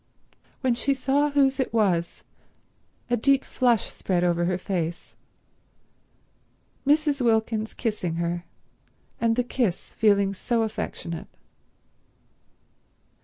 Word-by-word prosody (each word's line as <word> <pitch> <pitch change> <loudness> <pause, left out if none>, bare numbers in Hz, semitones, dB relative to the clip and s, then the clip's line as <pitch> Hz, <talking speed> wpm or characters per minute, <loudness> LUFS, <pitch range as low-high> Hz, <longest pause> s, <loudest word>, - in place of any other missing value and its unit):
When 260 -3 +2
she 275 +4 0
saw 280 +2 +1
whose 275 -2 +2
it 260 - 0
was, 185 -7 0 0.9
a - - +5
deep 270 +3 +2
flush 240 -4 +2
spread 180 -2 -1
over 175 -1 +2
her 180 0 0
face. 175 -3 -3 1.7
Mrs. 295 -1 +3
Wilkins 220 -2 +1
kissing 210 -8 -2
her 170 +1 -2 0.8
and 230 -1 +2
the 250 - +1
kiss 235 -7 -1
feeling 200 -3 +3
so 230 +4 0
affectionate. 170 -6 -5
225 Hz, 105 wpm, -25 LUFS, 180-260 Hz, 1.7 s, a